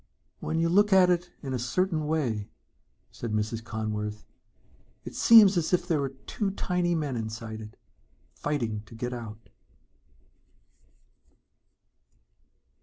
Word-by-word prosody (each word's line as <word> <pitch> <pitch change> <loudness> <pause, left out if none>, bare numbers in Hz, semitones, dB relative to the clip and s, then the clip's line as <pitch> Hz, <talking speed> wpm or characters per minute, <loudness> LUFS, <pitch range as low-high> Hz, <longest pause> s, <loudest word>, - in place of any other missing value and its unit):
"When 160 - -2
you 165 0 +2
look 205 +5 +4
at 185 -1 +6
it 175 0 0
in 135 -2 -4
a 125 - -1
certain 155 +6 0
way," 120 -10 -1 0.6
said 115 -2 -5
Mrs. 110 +1 -2
Conworth, 105 -1 -4 0.8
"it - - -7
seems 210 -5 +7
as 170 +1 0
if 180 - +2
there 155 -4 +1
are 135 - -1
two 135 +9 -4
tiny 180 -3 0
men 150 -5 -2
inside 110 -1 -5
it, 105 0 -11 0.6
fighting 115 -8 -2
to 115 - -12
get 125 +2 -4
out." 115 -2 -9
135 Hz, 125 wpm, -28 LUFS, 110-175 Hz, 0.8 s, seems